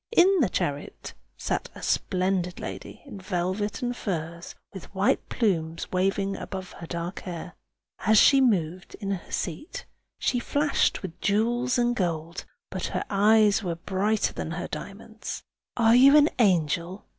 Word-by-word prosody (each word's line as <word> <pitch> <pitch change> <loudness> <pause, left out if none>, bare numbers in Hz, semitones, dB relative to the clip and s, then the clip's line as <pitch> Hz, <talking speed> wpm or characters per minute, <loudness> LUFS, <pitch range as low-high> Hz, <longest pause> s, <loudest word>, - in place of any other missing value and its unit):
In 385 -2 +5
the 245 - +3
chariot 145 -4 -3 0.2
sat - - -2
a - - -10
splendid 185 -1 0
lady - - -8
in 235 -8 -9
velvet 190 +4 -2
and 245 0 -1
furs, 170 -5 -5 0.2
with 190 - -10
white 190 +2 +1
plumes 165 -8 -1
waving 195 +1 0
above 190 -2 -6
her 170 - -10
dark 170 +2 -4
hair. 175 -1 -7 0.5
As 220 +2 +3
she 270 +5 +7
moved 185 -7 0
in 200 -1 -4
her 190 -3 -5
seat, 310 - -4 0.3
she 245 - 0
flashed 290 0 +1
with 175 -3 -8
jewels 240 +5 +1
and 240 0 +2
gold, 170 -3 -3 0.3
but - - -3
her - - -2
eyes 210 +1 +4
were 175 -4 -2
brighter 200 +5 0
than - - -4
her 175 +1 -4
diamonds. 215 +2 -7 0.3
"Are 230 -1 +5
you 275 +4 +8
an 300 +1 +6
angel?" 175 -2 +1
195 Hz, 150 wpm, -26 LUFS, 175-230 Hz, 0.5 s, you